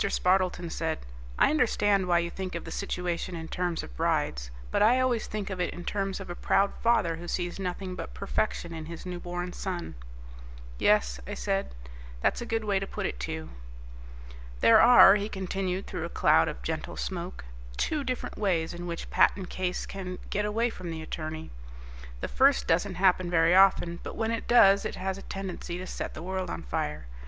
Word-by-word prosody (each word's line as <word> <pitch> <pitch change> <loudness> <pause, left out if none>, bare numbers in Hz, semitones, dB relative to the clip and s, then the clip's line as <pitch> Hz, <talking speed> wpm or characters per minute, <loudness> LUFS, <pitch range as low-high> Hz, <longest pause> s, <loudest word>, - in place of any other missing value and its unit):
Spardleton 180 -3 +1
said, 160 -1 -1 0.4
"I - - +5
understand 205 -9 +2
why 175 -1 +4
you 170 0 0
think 185 -1 -5
of 170 - -4
the - - -7
situation 180 -2 -3
in 160 -1 -6
terms 175 -1 -2
of - - -10
brides, - - 0 0.2
but - - +1
I 240 +4 +5
always 250 -3 +1
think 205 -2 -4
of 185 -1 -3
it - - -2
in 175 - -8
terms 195 -1 -2
of 195 - -7
a 175 - -4
proud 200 +2 +2
father 210 -8 +2
who 175 +1 -8
sees 175 +1 -2
nothing 185 0 -4
but - - -7
perfection 195 -3 -2
in 160 -1 -6
his 170 +1 -8
newborn 175 0 -5
son." 180 -3 -4 0.9
"Yes," 60 0 +3
I - - -4
said, 195 - -2 0.4
"that's - - +1
a 235 - -5
good 225 -1 -1
way 200 -2 +1
to 195 - -4
put - - -4
it, 60 - -3
too." 80 +5 -4 1.1
"There 115 - +7
are," 235 -4 +9
he 205 +1 -3
continued 190 -1 -3
through - - -4
a - - -5
cloud - - +4
of - - -5
gentle - - -4
smoke, 180 - -5 0.3
"two 300 -2 0
different 255 -1 -4
ways 175 -6 0
in 175 +1 -6
which 170 -1 -4
a - - -10
patent 190 -3 +2
case 180 -1 -2
can 185 -2 -6
get 210 +1 0
away 225 +3 0
from 180 -5 -7
the 160 -1 -5
attorney. 155 0 -6 0.7
The - - -2
first 275 +1 +3
doesn't 180 +3 +1
happen 185 -1 +3
very 165 0 +4
often, 185 -2 +4
but - - -7
when 225 0 -1
it 230 - -3
does 200 -5 +6
it - - -3
has 190 +1 -3
a - - -10
tendency 190 -3 -5
to 185 - -6
set - - -5
the 155 - -7
world 185 +1 -3
on - - -5
fire. 75 +3 -3
185 Hz, 200 wpm, -28 LUFS, 170-200 Hz, 1.1 s, are